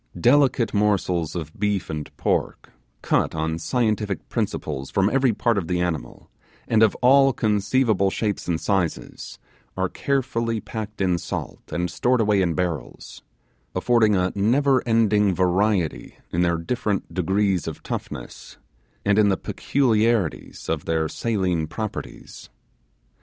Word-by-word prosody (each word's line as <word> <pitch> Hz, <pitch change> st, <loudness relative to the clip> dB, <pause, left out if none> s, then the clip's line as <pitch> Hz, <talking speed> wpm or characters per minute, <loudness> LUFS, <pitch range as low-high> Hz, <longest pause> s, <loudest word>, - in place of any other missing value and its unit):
Delicate 130 Hz, +1 st, +3 dB
morsels 95 Hz, -6 st, +1 dB
of 80 Hz, -2 st, -5 dB
beef 105 Hz, -2 st, 0 dB
and 75 Hz, -1 st, -5 dB
pork, -, -, -1 dB, 0.3 s
cut -, -, +1 dB
on 80 Hz, +1 st, -2 dB
scientific 105 Hz, +1 st, -1 dB
principles 70 Hz, -3 st, -3 dB
from 100 Hz, +1 st, +1 dB
every 135 Hz, -2 st, +3 dB
part 115 Hz, 0 st, +1 dB
of 85 Hz, -, -6 dB
the 90 Hz, -1 st, 0 dB
animal, 85 Hz, -4 st, -3 dB, 0.4 s
and 110 Hz, -1 st, +3 dB
of 110 Hz, -2 st, +4 dB
all 135 Hz, +2 st, +6 dB
conceivable 105 Hz, -1 st, +1 dB
shapes 105 Hz, +1 st, -2 dB
and 85 Hz, -2 st, 0 dB
sizes, 95 Hz, -4 st, -2 dB, 0.4 s
are 95 Hz, -1 st, 0 dB
carefully 115 Hz, -4 st, -1 dB
packed 110 Hz, -1 st, -6 dB
in 90 Hz, -2 st, +1 dB
salt, 85 Hz, -, -5 dB
and 90 Hz, -1 st, -2 dB
stored 125 Hz, 0 st, +1 dB
away 105 Hz, -3 st, +3 dB
in 85 Hz, -3 st, 0 dB
barrels; 85 Hz, -9 st, -4 dB, 0.5 s
affording 110 Hz, +2 st, +3 dB
a 90 Hz, 0 st, +1 dB
never 130 Hz, +6 st, +2 dB
ending 105 Hz, -4 st, +3 dB
variety 90 Hz, -, 0 dB, 0.2 s
in 85 Hz, -, 0 dB
their 85 Hz, -1 st, +2 dB
different 100 Hz, +3 st, -2 dB
degrees 95 Hz, 0 st, +1 dB
of -, -, -6 dB
toughness, -, -, -7 dB, 0.5 s
and 100 Hz, +1 st, +3 dB
in 105 Hz, -1 st, +5 dB
the 95 Hz, -, +1 dB
peculiarities 115 Hz, -, 0 dB
of 80 Hz, -2 st, -2 dB
their 80 Hz, -1 st, 0 dB
saline 90 Hz, -6 st, -1 dB
properties. 110 Hz, +5 st, -7 dB
100 Hz, 135 wpm, -23 LUFS, 85-115 Hz, 0.5 s, all